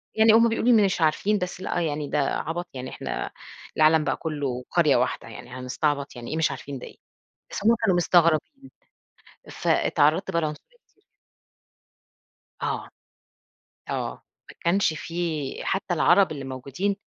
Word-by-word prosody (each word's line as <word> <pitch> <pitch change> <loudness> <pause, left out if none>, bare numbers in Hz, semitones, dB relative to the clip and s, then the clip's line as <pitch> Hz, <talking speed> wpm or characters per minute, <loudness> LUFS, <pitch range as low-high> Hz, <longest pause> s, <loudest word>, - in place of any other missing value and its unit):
يعني 220 0 +6
هم 230 +1 +6
بيقولوا 225 -2 +4
مش 185 -3 -1
عارفين، 195 +7 +2
بس 180 0 -4
لأ 175 - -1
يعني 145 0 -3
ده 150 - 0
عَبَط، 165 +5 -2
يعني 130 0 -6
إحنا - - -5 0.5
العالَم 155 0 +5
بقى - - -1
كُلّه 140 -6 -3
قرية 155 -5 +4
واحدة 125 -1 0
يعني، 115 +2 -10
هنستعبط، 140 +3 -2
يعني 120 +2 -7
إيه 160 - -2
مش 160 -3 +2
عارفين 135 +1 -7
ده - - -8
إيه، - - -15 0.5
بس - - -5
هم 230 +1 +6
كانوا 190 -5 +3
مستغربين، 175 - +2 0.8
فاتعرَّضت 160 +5 +2
بقى 170 -1 +1
لعنص 150 -1 -2 2.0
آه. - - -2 1.0
آه. - - -2 0.4
ما - - -15
كانش 175 -1 +3
في، 160 -3 -4
حتّى 190 -2 -1
العرب 180 +1 +4
اللي 140 -2 -6
موجودين 140 +10 -3
160 Hz, 145 wpm, -25 LUFS, 140-190 Hz, 2.0 s, يعني